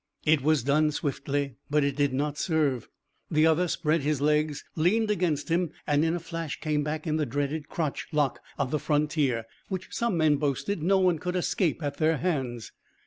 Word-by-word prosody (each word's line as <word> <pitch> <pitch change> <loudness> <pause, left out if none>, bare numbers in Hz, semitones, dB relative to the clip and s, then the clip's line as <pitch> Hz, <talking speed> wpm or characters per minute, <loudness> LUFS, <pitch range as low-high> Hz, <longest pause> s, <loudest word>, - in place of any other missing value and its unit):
It 155 -2 +4
was 150 -2 +2
done 150 +3 +3
swiftly, 140 -3 -2
but 150 0 +3
it 140 -1 0
did 145 -1 +2
not 145 +2 -1
serve. 150 - 0 0.4
The 155 0 +3
other 160 +3 +3
spread 160 -1 +1
his 145 0 0
legs, 150 0 +1
leaned 210 +7 +2
against 170 -7 0
him, 170 +1 +1 0.2
and 145 0 +2
in 165 +1 +1
a - - -2
flash 165 -2 -5
came 150 -2 0
back 155 +2 -3
in 155 -1 0
the 155 - +1
dreaded 145 +4 -2
crotch 155 -4 -2
lock 150 -4 +1 0.2
of 140 -2 -1
the 150 - +1
frontier, 145 -6 +1 0.2
which 190 -2 -5
some 235 -6 0
men 155 -2 +4
boasted 150 +6 -1
no 190 +5 +3
one 180 -4 +3
could 180 +2 -3
escape 175 -2 0
at 145 -1 -3
their 160 0 +2
hands. 130 -9 -2
150 Hz, 195 wpm, -27 LUFS, 145-165 Hz, 0.4 s, It